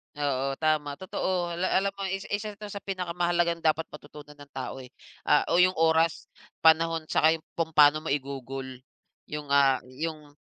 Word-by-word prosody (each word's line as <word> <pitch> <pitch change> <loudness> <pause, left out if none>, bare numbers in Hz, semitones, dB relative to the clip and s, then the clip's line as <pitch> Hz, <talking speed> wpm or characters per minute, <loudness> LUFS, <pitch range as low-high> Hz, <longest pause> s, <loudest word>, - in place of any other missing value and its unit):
Oo, 135 -2 -1
tama 155 -2 +1
totoo, 180 0 -2
ala 185 - 0
alam 195 +1 +2
mo 195 - -3
isa, 195 0 -4
isa 210 +1 -3
'to 210 +1 -9
sa 205 - -6
pinakamahalagang 175 -2 -1
dapat 160 +1 +1
matutunan 150 0 -13
ng 145 -1 -14
tao, 130 0 -5
eh, 130 -1 -11 0.3
ah, - - +5
o - - +3
yung 185 +1 +5
oras, 160 0 +2 0.3
panahon 165 0 +3
saka 160 +1 +4
yung 165 - -5 0.2
kung 160 -1 -1
pa'no 150 0 +6
mo 150 - 0
igugol 135 -2 -5 0.5
yung, 150 -1 -7
ah, 140 -2 +4
yung 150 +1 -6
160 Hz, 170 wpm, -27 LUFS, 145-175 Hz, 0.5 s, pa'no